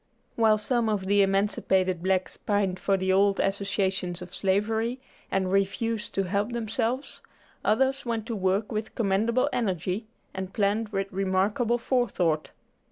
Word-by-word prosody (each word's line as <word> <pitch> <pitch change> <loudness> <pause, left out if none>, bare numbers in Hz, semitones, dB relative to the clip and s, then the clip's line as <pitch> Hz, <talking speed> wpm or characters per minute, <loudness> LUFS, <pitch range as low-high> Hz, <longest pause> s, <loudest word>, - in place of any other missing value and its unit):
While 220 -2 +4
some 230 +1 0
of 205 -3 -1
the 200 +1 +4
emancipated 195 -2 +1
blacks 185 0 0
pined 200 -3 0
for 195 -1 +1
the 190 0 +1
old 200 +1 +3
associations 195 -2 -1
of 180 0 -10
slavery, 220 +5 0 0.3
and 190 -1 0
refused 210 +3 0
to 195 - +2
help 200 +5 -1
themselves, 235 +3 -2 0.4
others 265 +5 +2
went 230 -3 -2
to 230 - -3
work 195 +2 0
with 215 0 -4
commendable 225 +4 +2
energy, 190 -1 -1 0.3
and 190 0 -5
planned 210 +2 +1
with 195 -1 -2
remarkable 195 +5 +1
forethought. 200 - 0
200 Hz, 140 wpm, -27 LUFS, 190-225 Hz, 0.4 s, While